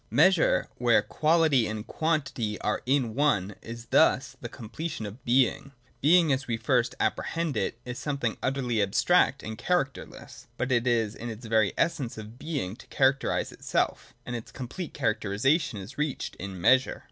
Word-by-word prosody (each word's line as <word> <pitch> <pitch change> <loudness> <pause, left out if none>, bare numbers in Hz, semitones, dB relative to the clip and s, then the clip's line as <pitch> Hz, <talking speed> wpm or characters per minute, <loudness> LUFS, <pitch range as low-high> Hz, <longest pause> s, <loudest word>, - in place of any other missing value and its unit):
Measure, 185 -3 +4
where 120 -3 +4
quality 155 0 +3
and 110 0 -5
quantity 135 -9 -1
are - - -1
in 130 -4 +1
one, 105 -8 +1
is 115 +1 -8
thus - - +3
the - - -6
completion 115 +2 -6
of 105 +5 -9
Being. 130 +2 +1 0.3
Being, 160 0 +5
as 130 0 -2
we 115 -2 -1
first 120 +1 +1
apprehend 165 -3 -1
it, - - -1
is 125 +2 -5
something 140 -6 -2
utterly 125 -4 0
abstract 135 - +2
and 110 0 -6
characterless: 155 -3 -3
but 130 +1 -2
it 120 0 +2
is 115 -3 +1
the 115 -2 -6
\ 110 - -15
very 110 -4 +3
essence 140 -9 -1
of 110 +3 -10
Being 140 - -3
to - - -15
characterise 135 0 +1
itself, - - -2
and 125 - -4
its 115 - -7
complete* 145 +7 -7
characterisation 115 - +1
is 100 +8 -9
reached 150 -2 -2
in 95 -1 -7
Measure. 130 +9 +3
125 Hz, 160 wpm, -27 LUFS, 110-145 Hz, 0.3 s, Being